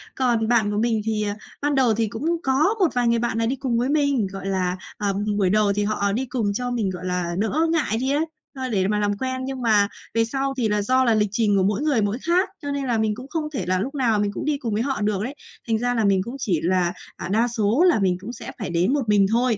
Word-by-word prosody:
Còn 240 -4 +1
bạn 220 -3 +2
của 205 - -2
mình 225 0 +1
thì, 215 -1 0
à, 205 -1 -2 0.3
ban 290 0 +1
đầu 250 -4 +4
thì 225 +1 0
cũng 315 +11 -1
có 295 +11 +2
một 360 -5 +2
vài 245 -1 +1
người 235 0 +3
bạn 235 -1 -1
này 230 - +1
đi 260 - 0
cùng 255 -3 -1
với 245 +3 0
mình, 285 -7 +2
gọi 195 0 -7
là, 185 -1 0 0.2
ờ, 200 -2 0 0.2
buổi 190 -3 +2
đầu 205 0 +3
thì 205 +1 0
họ 205 -1 0
đi 245 +6 -1
cùng 230 -5 -1
cho 245 +3 -2
mình, 225 -5 0
gọi 185 0 -6
là, 180 -1 -2
đỡ 300 +10 +1
ngại 290 -9 +1
đi 260 +2 0
ấy, 295 +3 +1 0.3
ơ, 260 -1 -4
để 195 -4 +1
mà 210 0 +1
làm 205 -1 0
quen. 260 +2 -3
Nhưng 265 -1 -5
mà 210 -4 +4 0.3
về 230 0 +2
sau 270 +3 -2
thì 230 -4 +1
là 210 0 +1
do 255 +5 +2
là 235 - +3
lịch 210 -1 +2
trình 210 -2 +2
của 190 - +3
mỗi 200 +5 +1
người 290 -7 +2
mỗi 205 +2 0
khác, 355 +4 +2
cho 285 -1 -4
nên 280 -1 -2
là 240 -3 +1
mình 220 -1 +1
cũng 255 +3 -9
không 310 -1 -2
thể 260 - -2
là 185 0 +1
lúc 265 +9 -3
nào 235 -6 +2
mình 205 0 0
cũng - - -4
đi 300 -1 +1
cùng 235 -6 -3
với 215 +3 0
họ 270 -5 -2
được 205 -1 0
đấy, 265 +5 -5 0.3
thành 225 -1 +2
ra 245 +2 0
là 225 -2 +1
mình 195 -2 +3
cũng 235 +6 -7
chỉ 190 - 0
là, 180 0 +1 0.2
à, - - -5
đa 220 +5 +2
số 230 +5 +2
là 335 - +4
mình 185 -3 +1
cũng 230 +5 -7
sẽ - - -8
phải 200 - -4
đến 175 +8 +1
một 265 -7 -1
mình 205 -1 +5
thôi. 240 -1 +2
225 Hz, 290 wpm, -23 LUFS, 205-260 Hz, 0.3 s, mình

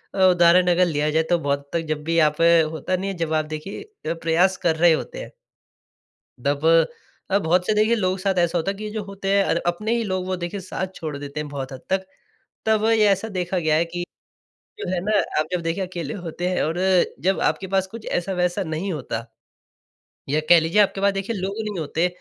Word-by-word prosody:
अ, - - -3
उदाहरण 175 +1 +5
अगर 180 +1 +4
लिया 150 -3 0
जाए 160 +1 +2
तो 175 - +4
बहुत 140 -1 -2
तक 170 - +2
जब 155 -1 -2
भी 165 +2 -1
यहाँ 155 -2 +5
पे 165 - +4
होता 160 +3 -2
नहीं 190 +2 -3
है - - -6
जब 165 -1 -2
आप 155 - -2
देखिए 165 - -6
प्रयास 170 +3 +2
कर 165 -2 +3
रहे 170 +1 +5
होते - - -4
हैं - - -8 1.1
दब 145 +2 0 0.6
अब 200 +1 +2
बहुत 180 +3 +2
से 215 - +3
देखिए 215 +2 +3
लोगों 185 -4 0
के 190 - -9
साथ 195 -1 +1
ऐसा 175 0 +2
होता 170 +4 0
है 200 - -9
कि 215 - -7
ये 215 - -4
जो 215 -1 -4
होते 195 0 -4
हैं 200 0 +4
और - - +1
अपने 210 +6 -1
ही 230 - -1
लोग 185 -3 -2
वो 185 0 -1
देखिए 185 +4 -4
साथ 190 0 -4
छोड़ 155 -3 -5
देते 140 +1 -6
है 150 - -3
बहुत 140 -2 -6
हद 130 - -9
तक। 190 0 0 0.6
तब 220 -1 +2
ये 220 -2 +4
ऐसा 195 +2 +1
देखा 185 -2 -2
गया 155 -3 +1
है 165 - +3
कि 175 +1 -5 0.7
जो 420 - -5
है 180 - 0
ना 210 0 +2 0.2
आप 155 - -1
जब 180 - 0
देखिए 165 +4 -1
अकेले 170 -5 -5
होते 175 -1 -4
है 185 - 0
और 165 +3 -2 0.5
जब 190 +1 +2
आपके 190 - 0
पास 190 0 0
कुछ 225 -1 -9
ऐसा-वैसा 180 +1 -1
नहीं 170 +3 -3
होता। 115 -6 -4 1.1
या 150 +2 +2
कह 175 - +9
लीजिए 165 +6 +3
आपके 195 -1 +1
पास 200 0 +3
देखिए 195 +4 -3
लोग 195 0 -3
नहीं 210 -4 -4
होते, 160 +3 0
180 Hz, 230 wpm, -23 LUFS, 160-195 Hz, 1.1 s, कह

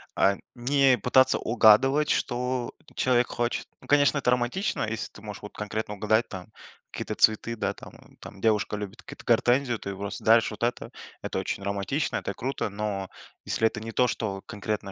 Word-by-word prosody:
а, 100 - +4 0.2
не 135 +1 +3
пытаться 130 +4 +4
угадывать, 125 +6 +4
что 125 0 -1 0.2
человек 125 -1 +2
хочет. 120 0 -2
Ну, - - -16
конечно, 145 0 +4
это 125 -3 +1
романтично. 125 - 0
Если 115 -1 -4
ты 105 - -14
можешь 105 -2 -8
вот 105 - -9
конкретно 105 0 -4
угадать, 110 +3 +1
там, 95 -2 -8 0.4
какие-то - - -5
цветы, 110 +2 +2
да, - - -2
там. - - -12 0.3
Там, 95 - -11
девушка 105 -1 +1
любит 105 +2 -7
какие-то - - -11
гортензию, 120 +1 +3
ты 100 - -7
ей 100 - -4
просто 100 +1 -6
даришь 115 +1 +5
вот 105 +1 -7
это. 120 - -1 0.3
Это - - -4
очень - - -3
романтично, 100 +9 -2
это 100 - -2
круто. 130 -3 -3
Но, 100 -2 -3 0.4
если 110 - +2
это 110 - -4
не 115 +1 -6
то, 125 +2 +3
что 100 -5 -3
конкретно 105 -1 -4
115 Hz, 180 wpm, -27 LUFS, 105-125 Hz, 0.4 s, даришь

